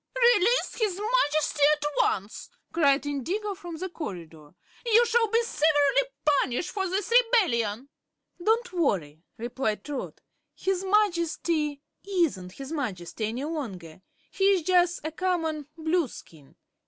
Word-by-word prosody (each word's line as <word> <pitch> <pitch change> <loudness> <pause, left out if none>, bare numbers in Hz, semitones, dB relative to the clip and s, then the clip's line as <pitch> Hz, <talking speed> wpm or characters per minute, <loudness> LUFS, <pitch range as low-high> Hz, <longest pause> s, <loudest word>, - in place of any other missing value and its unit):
"Release 450 +6 +1
his 405 -4 0
Majesty 310 -11 +1 0.2
at 295 - -6
once!" 200 +2 -1 0.2
cried 290 -4 +3
Indigo 355 - -2
from 350 -3 -8
the 365 +4 -4
corridor. 170 - -8 0.3
"You 470 0 +5
shall 465 0 +2
be 460 +2 +2
severely 315 - +2 0.2
punished 285 0 +1
for 385 -2 -2
this 390 +4 -2
rebellion." 305 - +2 0.6
"Don't 460 +2 +1
worry," 165 - -1 0.2
replied 230 -3 -3
Trot. 285 -3 -5 0.4
"His 380 -1 -1
Majesty 340 -7 +1 0.2
isn't 320 - -1
his 275 +5 -8
Majesty 215 - -3
any 240 +5 -4
longer; 195 - -6 0.3
he's 390 -3 +2
jus' 355 0 +3
a 315 - -3
common 320 -4 -2
Blueskin. 315 - -3
320 Hz, 120 wpm, -27 LUFS, 250-390 Hz, 0.6 s, You